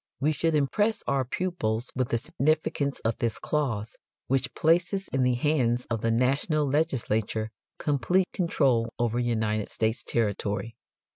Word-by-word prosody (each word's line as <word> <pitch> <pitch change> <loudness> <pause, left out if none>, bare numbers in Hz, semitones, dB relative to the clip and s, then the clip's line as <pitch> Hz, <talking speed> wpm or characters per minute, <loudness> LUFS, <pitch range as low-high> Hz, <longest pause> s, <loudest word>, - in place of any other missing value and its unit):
We 145 +3 +2
should 160 +2 +1
impress 205 +10 +1
our 140 -1 +1
pupils 125 -6 -2
with 130 -2 0
the 115 - +1
significance 140 +2 0
of 115 0 -1
this 115 -2 0
clause 115 -8 -2 0.3
which 135 0 0
places 175 +4 +2
in 135 - 0
the 125 -1 +3
hands 125 -3 +1
of 115 -2 -1
the 115 - +1
national 140 +6 +2
legislature 115 -7 0 0.3
complete 150 +6 +2
control 130 -10 +2
over 120 0 0
United 110 -3 0
States 110 +1 -1
territory. 105 0 -1
130 Hz, 140 wpm, -27 LUFS, 115-150 Hz, 0.3 s, the